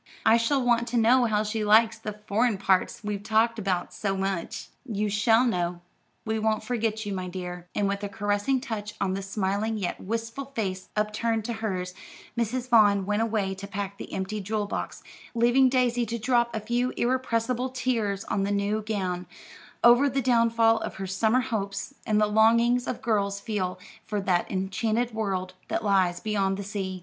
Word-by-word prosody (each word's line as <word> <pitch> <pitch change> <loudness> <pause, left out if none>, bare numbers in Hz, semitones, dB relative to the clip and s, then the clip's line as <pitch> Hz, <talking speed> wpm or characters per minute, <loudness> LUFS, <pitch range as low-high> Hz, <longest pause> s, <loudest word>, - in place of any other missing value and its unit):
I 225 +1 +6
shall 250 +5 +1
want 235 -1 +2
to 240 - -1
know 240 +2 +5
how 215 -2 +1
she 215 0 -2
likes 220 +2 +5
the 210 - -5
'foreign 220 +1 +1
parts' 190 +2 +1
we've 205 -1 -3
talked 220 +2 +2
about 185 -3 -1
so 195 -2 -2
much." 190 -3 -3
"You 210 -5 -2
shall 225 +4 +4
know. 175 -6 -1 0.4
We 220 0 -1
won't 215 0 0
forget 225 -2 -1
you, 205 - -3
my 185 -1 -3
dear," 180 -1 -6
and 205 - +1
with 200 +1 -2
a 205 - -2
caressing 205 +5 0
touch 210 -5 -5
on 190 -1 0
the 195 - -3
smiling 200 +2 -1
yet 185 -4 -3
wistful 230 +6 -4
face 190 -4 -3
upturned 215 +1 0
to 235 - -2
hers, 185 -5 -3 0.4
Mrs. 240 +2 -1
Vaughn 205 -5 +5
went 210 +2 0
away 215 -4 0
to 195 +1 -8
pack 200 0 -5
the - - -8
empty 195 +2 -3
jewel 210 +1 -2
box, 205 - -5 0.3
leaving 240 +3 +4
Daisy 245 -2 +2
to 235 +2 -2
drop 235 0 +1
a - - 0
few 240 +3 0
irrepressible 250 0 0
tears 230 -6 -1
on 200 - -1
the 195 - 0
new 205 +1 0
gown, 185 -4 -3 0.6
over 245 +4 +6
the 270 +1 -1
downfall 230 -2 +3
of - - -5
her 195 - -5
summer 220 +6 +2
hopes, 210 -1 -3
and 210 -2 +3
the 210 - +4
longings 230 +3 +3
all - - -1
girls 200 -3 0
feel 190 -5 -2 0.3
for 210 -1 -1
that 185 -3 0
enchanted 220 +5 -1
world 190 -4 -2
that - - -2
lies 185 -3 +2
beyond 195 -2 0
the 200 - -4
sea. 190 -2 -4
215 Hz, 185 wpm, -27 LUFS, 195-230 Hz, 0.6 s, I